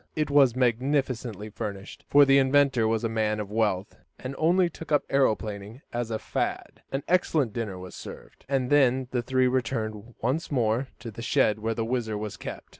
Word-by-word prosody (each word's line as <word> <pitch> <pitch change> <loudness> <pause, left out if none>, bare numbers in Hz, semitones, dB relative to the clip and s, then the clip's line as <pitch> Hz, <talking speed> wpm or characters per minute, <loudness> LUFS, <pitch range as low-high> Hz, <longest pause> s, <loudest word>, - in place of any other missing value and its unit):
It 155 -2 -1
was 135 -4 +5
magnificently 125 -4 0
furnished, 100 -1 -7
for 145 0 +7
the 135 0 +5
inventor 135 -3 +3
was 110 0 0
a - - +2
man 110 -1 0
of 105 -1 -5
wealth, 105 -3 0 0.2
and 130 +1 -6
only 175 +3 +4
took 165 -1 -10
up 145 - +2
aeroplaning 110 -3 -1
as 120 -1 -2
a 110 - -1
"fad." - - -3
An 135 +1 -2
excellent 155 - +2
dinner 110 -5 -4
was 90 0 -9
served, - - -11
and 135 -2 0
then 130 -3 +3
the 125 - 0
three 130 +2 +1
returned 115 -3 -2
once 135 +9 -1
more 120 0 +1
to 115 - -8
the 115 - -9
shed 110 -2 +2
where 115 +1 -2
the 115 0 -1
WHIZZER 115 -3 -2
was 105 -1 -5
kept. - - -8
120 Hz, 190 wpm, -27 LUFS, 110-135 Hz, 0.2 s, for